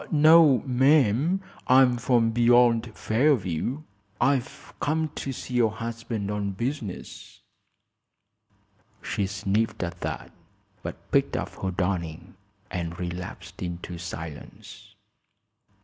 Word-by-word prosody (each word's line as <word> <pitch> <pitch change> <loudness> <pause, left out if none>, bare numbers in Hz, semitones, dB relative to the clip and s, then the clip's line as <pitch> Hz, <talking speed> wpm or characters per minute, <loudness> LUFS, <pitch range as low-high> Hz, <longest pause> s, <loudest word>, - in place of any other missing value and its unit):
"No, 155 -4 +6
ma'am; 135 - +3 0.3
I'm 130 -1 +6
from 120 -1 +2
beyond 120 0 +4
Fairview. 120 - 0 0.4
I've 130 0 -1
come 155 +1 0
to 135 - -5
see 125 0 -7
your 120 -2 +3
husband 115 -2 -4
on 100 -1 -2
business." 115 -2 -6 1.6
She 100 - -1
sniffed, 100 +2 -1
at 85 0 -5
that, - - -4 0.5
but - - -8
picked - - +2
up - - -3
her 95 - -1
darning 90 -3 -3 0.4
and 85 -1 -4
relapsed 90 0 -6
into 85 -1 -5
silence. 80 -3 -9
115 Hz, 100 wpm, -26 LUFS, 90-130 Hz, 1.6 s, No